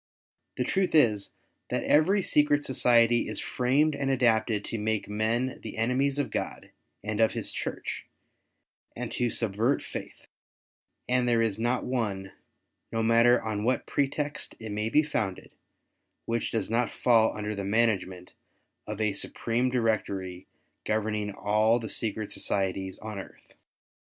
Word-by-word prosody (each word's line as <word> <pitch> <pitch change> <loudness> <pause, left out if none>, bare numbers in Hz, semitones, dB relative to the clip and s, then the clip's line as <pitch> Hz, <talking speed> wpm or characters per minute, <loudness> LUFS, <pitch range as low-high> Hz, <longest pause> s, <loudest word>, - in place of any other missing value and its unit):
The - - +1
truth 190 -3 0
is 110 -9 +4 0.4
that - - -1
every 185 +7 +3
secret 145 -2 +3
society 120 -2 +4
is - - -2
framed 140 +5 +1
and 140 -1 -1
adapted 115 -4 +2
to 115 - -3
make 110 0 -1
men 110 +5 -1
the 110 - -7
enemies 130 +5 +1
of 145 - -1
God - - -4 0.3
and 105 0 -3
of 110 - +4
his - - -3
Church, - - -5 0.9
and - - -5
to 120 -1 0
subvert 115 +4 +1
faith; - - -8 0.8
and 125 0 +2
there 115 -1 +3
is 110 -2 -1
not 120 +2 0
one, 100 -7 -2 0.6
no 115 0 0
matter 115 +2 +4
on 105 -2 -2
what 125 +3 +1
pretext 145 +1 -2
it 110 -1 -7
may 105 +2 -1
be 150 +6 +4
founded, 110 -11 -3 0.7
which 115 0 -1
does 110 -1 -2
not 120 +1 +2
fall 115 -3 +3
under 105 0 -3
the 100 -1 -4
management 95 -4 0 0.5
of 105 0 -5
a 105 -2 +1
supreme 120 +5 -1
Directory 100 -7 -1 0.4
governing 105 -1 -1
all 105 +3 +2
the 110 -2 -6
secret 110 -1 -2
societies 95 -1 -2
on 110 -2 -5
earth. - - -12
115 Hz, 145 wpm, -28 LUFS, 105-125 Hz, 0.9 s, is